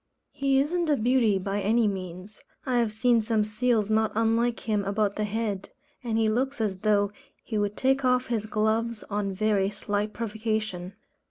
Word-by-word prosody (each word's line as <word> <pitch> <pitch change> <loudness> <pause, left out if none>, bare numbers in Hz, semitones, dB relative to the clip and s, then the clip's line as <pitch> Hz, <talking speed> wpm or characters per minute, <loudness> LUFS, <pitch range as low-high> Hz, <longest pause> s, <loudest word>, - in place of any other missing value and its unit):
He 275 -1 +1
isn't 335 +4 0
a 290 - +3
beauty 235 -3 +3
by 195 +2 -2
any 225 +2 +3
means. 185 +1 -6 0.2
I 250 -2 +1
have 230 -2 +1
seen 230 +2 +3
some 220 -1 +1
seals 215 0 0
not 220 0 +2
unlike 230 +1 +1
him 210 -2 0
about 200 +1 0
the 215 - -1
head; 210 -2 -3 0.3
and 225 -2 -1
he 225 -1 +3
looks 260 +5 0
as 200 -4 -1
though 205 -1 +2 0.3
he 215 -3 -2
would 205 0 -1
take 270 +1 +2
off 250 0 +3
his 220 -3 -2
gloves 220 +1 0
on 200 -1 -1
very 200 0 +1
slight 205 +1 -2
provocation. 215 -4 -3
215 Hz, 175 wpm, -27 LUFS, 205-235 Hz, 0.3 s, a